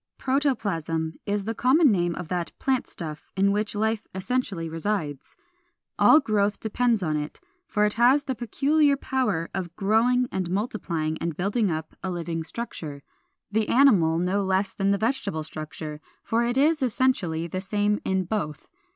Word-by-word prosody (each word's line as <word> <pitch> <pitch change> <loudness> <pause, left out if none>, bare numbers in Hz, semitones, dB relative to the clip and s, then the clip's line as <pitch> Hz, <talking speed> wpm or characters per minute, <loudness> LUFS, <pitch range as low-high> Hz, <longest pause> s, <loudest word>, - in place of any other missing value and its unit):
Protoplasm 195 - 0
is 205 -1 -1
the 225 - -1
common 265 +5 +4
name 175 -3 +1
of 175 - -6
that 175 0 -3
plant 265 -2 0
stuff 155 -2 -7
in 200 +1 +4
which 210 +1 -1
life 220 +1 0
essentially 190 -4 -2
resides. 160 -4 -3 0.6
All 305 - +7
growth 210 -6 0
depends 225 -1 +1
upon 155 -2 0
it; 150 0 -5 0.3
for 210 -1 +2
it 210 - +1
has 250 +5 +4
the 275 -2 -2
peculiar 280 +5 +2
power 255 -13 -1
of 175 -2 -4
growing 235 +5 +2
and 185 -2 -2
multiplying 170 -6 -2
and 165 -3 -3
building 200 +3 +1
up 155 -1 -4
a 190 - -3
living 170 -2 -3
structure, 155 -8 -6 0.5
the 215 0 +1
animal 205 -12 +5
no 185 +4 +1
less 190 +1 0
than 195 0 0
the 200 - +3
vegetable 220 - -1
structure, 155 0 -7 0.2
for 230 +1 +1
it 240 +2 0
is 305 +2 +3
essentially 210 -10 +1
the 185 +2 -4
same 205 +1 0
in 190 0 0
both. 160 -7 -4
200 Hz, 160 wpm, -25 LUFS, 165-240 Hz, 0.6 s, All